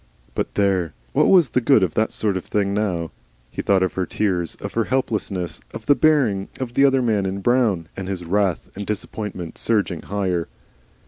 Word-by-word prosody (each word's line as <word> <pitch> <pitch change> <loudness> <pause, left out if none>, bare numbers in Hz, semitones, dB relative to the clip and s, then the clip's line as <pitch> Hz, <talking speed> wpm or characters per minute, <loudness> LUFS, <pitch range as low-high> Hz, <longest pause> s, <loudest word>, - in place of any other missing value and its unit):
But - - -3
there! 95 -6 +1 0.2
what - - +4
WAS 175 -8 +6
the 125 - +1
good 115 -3 +5
of 90 - 0
that 110 0 +1
sort 105 -3 0
of 95 - -3
thing 100 -1 0
now? 90 -6 -1 0.4
He - - -3
thought 95 -2 +3
of 95 - -1
her 95 -2 -2
tears, 90 -6 -1
of - - -7
her 115 -1 +1
helplessness, 105 -8 -2
of - - -7
the 145 - +6
bearing 140 -11 +2
of 125 -2 -4
the 135 +2 +5
other 135 -2 +3
man 105 -5 +1
in 95 +1 -3
brown, 110 -8 +2
and 95 -1 -5
his 95 -3 -4
wrath 95 -1 0
and 100 +1 -6
disappointment 105 -4 -5
surged 100 -7 0
higher. 95 -4 -1
100 Hz, 195 wpm, -22 LUFS, 95-115 Hz, 0.4 s, WAS